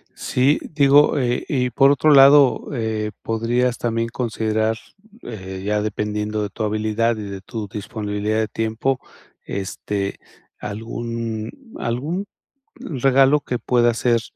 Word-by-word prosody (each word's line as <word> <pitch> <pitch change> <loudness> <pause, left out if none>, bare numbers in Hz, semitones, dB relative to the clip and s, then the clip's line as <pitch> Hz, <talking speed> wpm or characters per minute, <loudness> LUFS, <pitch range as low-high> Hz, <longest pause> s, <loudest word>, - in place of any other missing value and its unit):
Sí. 135 +4 +1
Digo, 145 0 +5
eh, 125 -3 0
y 125 -3 0
por 135 +3 +4
otro 150 +2 +3
lado, 140 0 +6
eh, 110 -3 -2
podrías 120 +2 0
también 115 -1 -1
considerar, 110 -2 -1 0.5
eh, 95 -4 -7
ya 105 0 +1
dependiendo 105 0 -2
de 105 - -2
tu 110 - -5
habilidad 110 +2 0
y 105 - -5
de 100 -1 -7
tu 110 +1 -6
disponibilidad 105 +1 -3
de 110 - 0
tiempo, 115 +5 -1 0.5
este, 100 0 -4 0.4
algún 115 +1 -4 0.3
algún 150 +12 -2 0.5
regalo 135 0 +3
que 125 -4 -3
pueda 120 -1 +2
ser, 120 0 +1
115 Hz, 125 wpm, -21 LUFS, 105-125 Hz, 0.5 s, lado